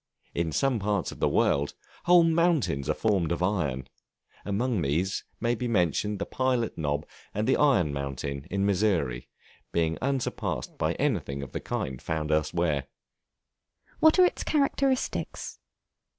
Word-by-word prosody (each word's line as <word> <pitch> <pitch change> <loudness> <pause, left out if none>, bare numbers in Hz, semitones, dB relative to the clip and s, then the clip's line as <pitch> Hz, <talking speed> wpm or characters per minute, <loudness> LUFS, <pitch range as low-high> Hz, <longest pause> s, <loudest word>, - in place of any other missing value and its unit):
In 85 -1 -1
some 130 - +1
parts 100 -2 -1
of - - -11
the - - +2
world, 70 +1 +1 0.3
whole 175 -1 +7
mountains 165 - +2
are - - +2
formed 95 -7 +1
of 85 +1 -1
iron; 75 -10 -1 0.6
among 110 +1 0
these 85 +7 0 0.2
may 120 +1 +1
be 120 +1 -2
mentioned 105 0 +1
the - - -3
Pilot 130 -3 0
Knob 75 -1 -1 0.3
and 105 +2 0
the 130 - +4
Iron 95 - +3
Mountain, 70 0 -4
in 100 +1 0
Missouri, 90 - +1 0.4
being 80 -1 0
unsurpassed 135 0 -2
by - - +1
anything 70 0 -1
of 70 - -8
the - - -3
kind 65 -2 -3
found 80 -1 -2
elsewhere. 75 -2 +1 1.1
What 315 +2 +6
are 365 - +8
its - - -1
characteristics? 275 -3 0
95 Hz, 145 wpm, -27 LUFS, -, 1.1 s, are